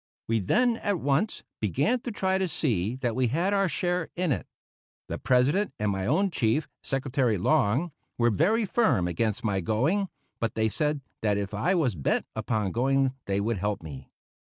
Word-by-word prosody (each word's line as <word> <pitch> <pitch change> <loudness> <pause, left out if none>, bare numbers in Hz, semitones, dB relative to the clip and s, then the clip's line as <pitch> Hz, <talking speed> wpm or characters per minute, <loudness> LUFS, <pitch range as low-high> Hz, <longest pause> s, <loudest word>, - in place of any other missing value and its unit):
We 115 0 +2
then 235 - +2
at 200 -5 -1
once 145 +10 0 0.2
began 140 - +1
to 240 - -5
try 190 -2 0
to 190 - +1
see 115 - 0
that 120 -2 0
we 130 -1 +2
had 170 - 0
our 195 -2 +2
share 180 -2 -1
in 175 -3 0
it. 100 -10 -2 0.6
The - - -3
President 135 +7 +2
and 105 -1 0
my 95 0 -2
own 190 +9 +2
chief, 125 +1 +1
Secretary 130 -4 0
Long, 135 - +2 0.3
were 120 -1 +3
very 210 - +2
firm 200 - +2
against 105 +5 -1
my 100 -4 +1
going, 155 - +1 0.3
but 115 - -2
they 110 0 +2
said 150 +4 0 0.2
that 105 -2 +1
if 100 0 -3
I 145 - +1
was 145 - +2
bent 75 -6 0
upon 105 -4 -1
going 135 +3 +2
they 100 0 0
would 105 0 -1
help 105 -2 -2
me. 70 -4 -9
130 Hz, 180 wpm, -27 LUFS, 105-175 Hz, 0.6 s, were